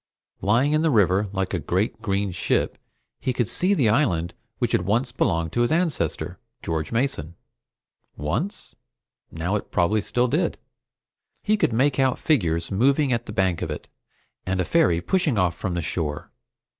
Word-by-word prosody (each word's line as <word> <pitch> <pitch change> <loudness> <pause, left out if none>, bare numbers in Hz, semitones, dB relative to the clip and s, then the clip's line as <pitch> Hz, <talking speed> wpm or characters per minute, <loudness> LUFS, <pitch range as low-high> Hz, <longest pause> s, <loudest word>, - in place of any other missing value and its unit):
Lying 120 +9 +3
in 155 0 +2
the 165 - +3
river 100 - +3
like 95 -1 -2
a 90 - 0
great 95 +7 -1
green 100 -2 -1
ship, - - -1 0.4
he 130 - -1
could 120 -3 0
see 185 - +2
the 135 - +3
island 90 - +1 0.2
which - - 0
had - - +2
once 105 +8 0
belonged 85 -3 0
to 120 - 0
his 120 - +2
ancestor, 165 -3 -1 0.2
George 80 -1 -2
Mason. 115 - -1 0.8
Once? 105 - -3 0.6
Now 85 +5 -2
it 105 - -3
probably 100 +5 +2
still 125 +4 +1
did. 160 +7 0 0.9
He 215 - +3
could 205 - +1
make 130 +4 +2
out 130 -1 +3
figures 85 - +1
moving 135 +6 +3
at 115 0 -2
the - - -5
bank 95 -5 0
of - - -2
it, - - -6 0.6
and 95 0 -2
a 95 - +1
ferry 155 - +3
pushing 155 - +1
off 90 -3 +2
from 90 0 -3
the 85 - -2
shore. 75 -3 -3
105 Hz, 170 wpm, -24 LUFS, 90-135 Hz, 0.9 s, Lying